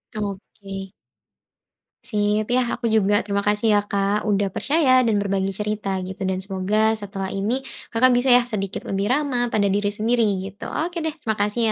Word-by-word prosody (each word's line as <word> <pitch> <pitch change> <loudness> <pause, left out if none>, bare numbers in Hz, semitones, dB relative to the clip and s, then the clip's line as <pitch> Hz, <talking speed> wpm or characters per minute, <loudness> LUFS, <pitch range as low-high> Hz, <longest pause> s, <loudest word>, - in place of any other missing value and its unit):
Oke. 195 -1 -6 1.1
Sip 210 -1 0
yah 250 -1 +1
aku - - -5
juga, 205 -1 +3
terima 200 -1 0
kasih 210 +1 +2
ya 205 - +4
Kak 200 +1 +1
udah 200 -2 +1
percaya 280 -4 +3
dan 225 -4 +2
berbagi 195 -1 0
cerita 205 -1 -2
gitu 190 +1 -8
dan 185 - -1
semoga 210 +3 +1
setelah 200 -3 -4
ini 230 +7 -1 0.2
Kakak 250 +2 +4
bisa 245 +2 +2
ya 245 -1 +6
sedikit 200 -4 -4
lebih 195 +2 -1
ramah 255 -3 +1
pada 210 -2 +1
diri 200 +1 +1
sendiri 225 +3 +1 0.2
gitu, 200 +1 -8
oke 345 +2 -3
deh 320 -1 -2
terima 220 -8 -2
kasih 210 +3 0
210 Hz, 170 wpm, -22 LUFS, 200-240 Hz, 1.1 s, ya